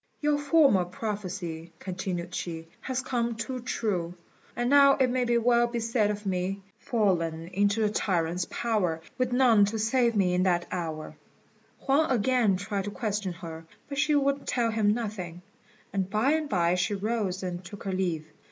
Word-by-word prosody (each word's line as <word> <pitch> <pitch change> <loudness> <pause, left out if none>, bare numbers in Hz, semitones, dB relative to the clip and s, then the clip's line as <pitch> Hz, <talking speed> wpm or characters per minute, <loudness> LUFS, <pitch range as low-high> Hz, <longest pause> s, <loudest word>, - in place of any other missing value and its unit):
"Your 295 -1 +1
former 290 - +4
prophecy," 180 -4 -5
continued 180 -1 -4
she, 165 -2 -5
"has 260 0 -3
come 235 -2 -1
too 250 +3 -4
true; 185 -8 -2 0.4
and 240 0 0
now 280 +1 +7
it 260 -2 +2
may 245 -2 +2
well 240 0 +3
be 235 0 -3
said 225 -2 +1
of 210 0 -4
me 190 +1 -2 0.2
'Fallen 170 -7 0
into 200 +3 +1
the 210 - +3
tyrant's 175 -4 0
power, 205 -9 0 0.2
With 255 -1 +1
none 245 -4 +5
to 215 +3 -3
save 235 +2 +2
me 185 -3 +2
in 180 - +2
that 175 -2 +2
hour.'" 160 -3 -4 0.6
Huang 295 +3 +2
again 240 -4 +2
tried 200 0 -3
to - - -2
question 205 -3 -2
her, 165 -1 -9 0.2
but 280 -1 -3
she 300 +1 +3
would 280 0 +1
tell 235 -2 +1
him 215 -2 +2
nothing; 200 -6 -4 0.5
and 190 -1 -1
by 215 +7 +2
and 310 -1 0
by 175 -3 +2
she 180 +3 0
rose 200 -2 -2
and 180 0 -4
took 200 +3 -10
her 195 - -2
leave. 175 -4 -1
205 Hz, 170 wpm, -28 LUFS, 180-240 Hz, 0.6 s, now